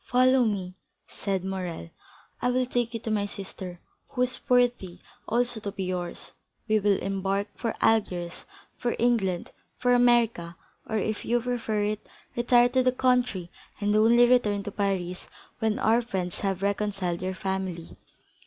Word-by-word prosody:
"Follow 255 +1 +4
me," 190 -4 -2 0.3
said 195 -2 -3
Morrel; 180 - -4 0.5
"I 250 - +2
will 255 +1 +2
take 240 -1 -1
you - - -2
to 225 - -3
my 205 -1 +1
sister, 185 -3 -7 0.3
who 250 - 0
is 250 0 -1
worthy 245 -8 +2 0.3
also 240 0 +1
to 205 -2 -4
be 195 -1 -4
yours. 180 -1 -4 0.4
We 215 -1 +3
will 205 -1 +3
embark 195 +1 -1
for 230 - -3
Algiers, 180 -6 +1 0.3
for 240 - -1
England, 210 -7 +1 0.3
for 245 0 +2
America, 235 -8 +3 0.3
or, 220 - 0
if 215 +1 -2
you 240 +1 +2
prefer 230 -3 -1
it, 210 0 -2 0.3
retire 240 0 +5
to 260 +1 +2
the 255 0 +3
country 245 -9 +1 0.3
and 205 0 +1
only 230 +3 +6
return 215 -5 +3
to 205 - -5
Paris 190 -3 -2 0.3
when 220 -2 +1
our 225 +2 +3
friends 190 -7 -3
have 195 -1 -1
reconciled 200 -4 -1
your 185 0 -2
family." 190 -3 -4
210 Hz, 155 wpm, -27 LUFS, 190-240 Hz, 0.5 s, only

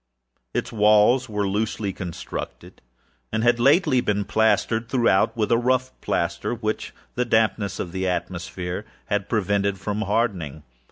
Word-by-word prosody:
Its 125 - -2
walls 110 +4 +4
were 105 -1 -1
loosely 105 0 -1
constructed, 90 -3 -7 0.5
and 110 0 0
had 120 0 +3
lately 140 0 +4
been 105 -2 0
plastered 110 +2 +1
throughout 120 -5 +2
with 110 0 0
a 115 - +4
rough 130 +1 +1
plaster, 85 +6 -1
which 110 -1 -3 0.2
the 125 - 0
dampness 110 -3 +1
of 85 - -4
the 95 +1 -2
atmosphere 90 +1 -3 0.3
had 105 -1 0
prevented 100 -2 +1
from 105 +3 -3
hardening. 95 - -1
105 Hz, 135 wpm, -24 LUFS, 95-120 Hz, 0.5 s, walls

